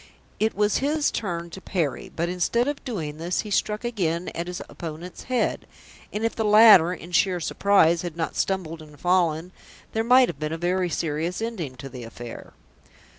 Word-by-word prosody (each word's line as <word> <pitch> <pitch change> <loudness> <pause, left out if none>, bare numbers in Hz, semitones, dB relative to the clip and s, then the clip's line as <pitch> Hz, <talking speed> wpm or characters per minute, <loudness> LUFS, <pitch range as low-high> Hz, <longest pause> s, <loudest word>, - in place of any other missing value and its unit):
It 220 +1 +1
was 210 0 +2
his 295 +2 +1
turn 170 -4 -3
to 190 - -9
parry, 155 -12 -2
but 170 +1 -2
instead 180 +8 +1
of 290 0 -3
doing 160 - -4
this, 170 +3 -1
he 210 - -8
struck 210 +3 0
again 180 -8 -1
at 170 +1 -5
his 180 0 -5
opponent's 170 +2 -8
head; 255 -1 -1 0.4
and 215 +2 -2
if 230 - -1
the 225 - -1
latter 210 -5 +8
in 180 -1 -8
sheer 180 +1 +2
surprise 170 -1 +3
had 175 -2 -6
not 165 - -2
stumbled 165 -4 -2
and 150 -2 -14
fallen, 175 -1 +1 0.4
there 225 - 0
might 250 +2 +6
have 140 - -6
been 155 +1 -2
a - - -3
very 180 +1 0
serious 165 +2 -2
ending 205 - -4
to 135 +2 -8
the 130 -2 -9
affair. 115 +1 -9
180 Hz, 185 wpm, -25 LUFS, 160-210 Hz, 0.4 s, latter